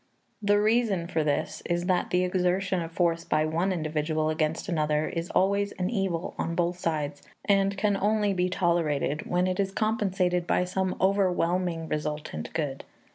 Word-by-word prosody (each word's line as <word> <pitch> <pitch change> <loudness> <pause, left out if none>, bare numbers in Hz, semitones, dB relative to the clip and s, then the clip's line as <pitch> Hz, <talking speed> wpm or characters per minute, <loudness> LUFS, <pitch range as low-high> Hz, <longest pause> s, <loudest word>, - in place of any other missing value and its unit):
The 205 0 +3
reason 215 -4 +2
for 160 -3 0
this 145 -1 -1
is 175 0 0
that 180 -1 +1
the 180 0 +2
exertion 185 0 +1
of 165 0 -5
force 170 -1 +1
by 155 0 +1
one 170 +5 0
individual 155 -2 -1
against 155 +2 -1
another 155 -3 +1
is 165 0 -4
always 200 +1 +1
an 185 +2 -2
evil 195 -4 -1
on 165 - -1
both 175 +1 0
sides, 150 -3 -2 0.2
and 195 0 +2
can 205 0 +2
only 205 +1 +1
be 180 -1 +1
tolerated 160 -5 0
when 180 +1 +2
it 185 0 -1
is 195 -1 +1
compensated 190 -5 0
by - - +2
some 185 +1 -1
overwhelming 180 -3 +1
resultant 150 - -4
good. 145 -4 -2
180 Hz, 165 wpm, -27 LUFS, 160-195 Hz, 0.2 s, The